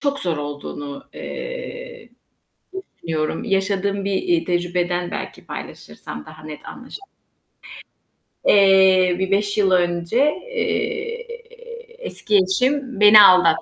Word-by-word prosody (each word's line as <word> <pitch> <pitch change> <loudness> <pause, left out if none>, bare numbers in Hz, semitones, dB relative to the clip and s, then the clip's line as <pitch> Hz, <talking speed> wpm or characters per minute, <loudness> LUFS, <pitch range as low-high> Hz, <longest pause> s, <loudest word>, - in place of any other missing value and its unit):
çok 280 -1 -1
zor 170 -4 -2
olduğunu, 145 -1 -7
eee, - - -8 0.9
düşünüyorum. 160 -1 -3
Yaşadığım 195 0 -1
bir, 200 - -1
eee, 345 -2 +1
tecrübeden 175 0 -1
belki - - -7
paylaşırsam 75 0 -9
daha 155 0 -13
net 155 -1 -10
anlaşı 260 +7 -10 1.5
Eee, 190 -2 +5
bir 190 0 -2
5 200 +1 0
yıl 195 -2 +3
önce, 175 +3 0 0.3
eee, 465 0 -3 0.8
eski 210 - 0
eşim 250 +6 0
beni 210 0 +9
aldattı. 180 -4 +6
195 Hz, 105 wpm, -21 LUFS, 175-260 Hz, 1.5 s, beni